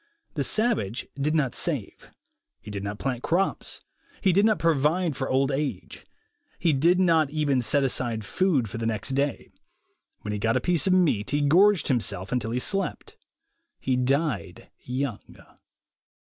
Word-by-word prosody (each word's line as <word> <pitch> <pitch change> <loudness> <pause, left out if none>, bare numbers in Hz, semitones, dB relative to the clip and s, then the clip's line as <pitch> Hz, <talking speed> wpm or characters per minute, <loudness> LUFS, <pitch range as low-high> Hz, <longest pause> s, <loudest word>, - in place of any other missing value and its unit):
The 145 - -1
savage 210 - 0
did 145 +3 -1
not 140 -5 +1
save; - - -3 0.5
he 105 - -10
did 100 -1 -5
not 100 +1 -4
plant 125 -1 -3
crops; 185 +7 -1 0.4
he 190 - +2
did 200 +4 +4
not 215 - +2
provide 165 +1 +1
for 130 - -3
old 135 +1 +2
age. 135 -8 -4 0.5
He 165 - +2
did 170 +7 +3
not 165 -5 +3
even 145 -3 +1
set 140 +4 +1
aside 120 -4 -1
food 145 - +1
for 110 - -6
the 115 - -1
next 110 +1 -2
day. 140 +1 -2 0.7
When 105 - -5
he 105 - -3
got 115 +2 +1
a - - +2
piece 180 -1 +1
of 185 - +4
meat, 155 - +2
he 145 0 0
gorged 180 +6 +4
himself, 105 -7 -1
until 120 -3 -1
he 120 - -2
slept. 195 +10 -2 0.6
He 130 - 0
died 130 - -1 0.2
3 125 - -4
oung. 130 -7 -6
140 Hz, 165 wpm, -26 LUFS, 115-165 Hz, 0.7 s, did